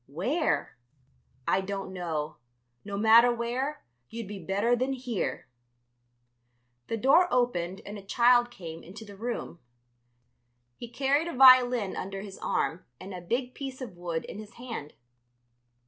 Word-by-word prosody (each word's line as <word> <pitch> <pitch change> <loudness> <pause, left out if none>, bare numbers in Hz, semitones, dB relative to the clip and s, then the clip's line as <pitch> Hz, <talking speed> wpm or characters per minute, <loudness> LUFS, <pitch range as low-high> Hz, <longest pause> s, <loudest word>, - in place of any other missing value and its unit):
"Where?" 200 - -1 0.7
"I 190 - +3
don't 195 0 -5
know. 160 -5 -3 0.5
No 200 -1 -5
matter 225 +3 +7
where, 245 +5 -2 0.3
you'd 230 -2 -6
be 205 0 -7
better 200 +7 +2
than 255 +3 -1
here." 250 - -3 1.4
The 225 - -2
door 275 - +5
opened 190 -7 0
and 205 +1 -7
a - - -11
child 240 +4 +4
came 165 -8 -9
into 210 +6 -11
the 205 -1 -11
room. 225 -5 -5 1.2
He 240 - -8
carried 275 +6 +1
a 340 - -5
violin 250 -5 +6
under 195 +1 -5
his 195 -1 -9
arm 165 +3 -1 0.2
and 190 +1 -8
a 180 - -6
big 245 +8 -2
piece 270 -2 -6
of 245 -9 -7
wood 170 -2 -4
in 205 - -8
his 215 +1 -10
hand. 230 - -7
225 Hz, 145 wpm, -28 LUFS, 190-250 Hz, 1.4 s, matter